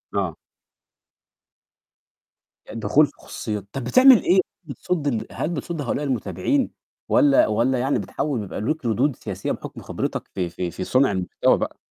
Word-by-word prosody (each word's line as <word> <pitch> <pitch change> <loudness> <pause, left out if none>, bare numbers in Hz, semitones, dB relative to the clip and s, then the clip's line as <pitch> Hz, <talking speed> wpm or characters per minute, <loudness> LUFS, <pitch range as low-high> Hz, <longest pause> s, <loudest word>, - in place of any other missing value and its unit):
آه. 95 -6 -1 2.3
الدخول 120 +7 +3
في 140 - -11
خصوصيات، 105 -3 -6
طب 135 - -4
بتعمل 255 - +7
إيه 185 +2 +4 0.2
بتصد 160 +1 -3
ال 115 -5 -1
هل 155 - -3
بتصد 165 0 -4
هؤلاء 145 +1 -2
المتابعين؟ 145 - 0 0.4
والّا 295 +2 +5
والّا 130 - +1
يعني 135 +3 +1
بتحاول 140 -4 -2
بيبقى 100 -2 -5
ليك 150 +5 -2
ردود 125 +5 +1
سياسية - - -4
بحُكم - - -7
خبرتك - - -3
في 90 -2 -2
في 85 0 -4
في 90 - -5
صنع 130 +4 +3
المحتوى 95 -2 +1
بقى؟ - - -4
130 Hz, 145 wpm, -23 LUFS, 110-160 Hz, 2.3 s, بتعمل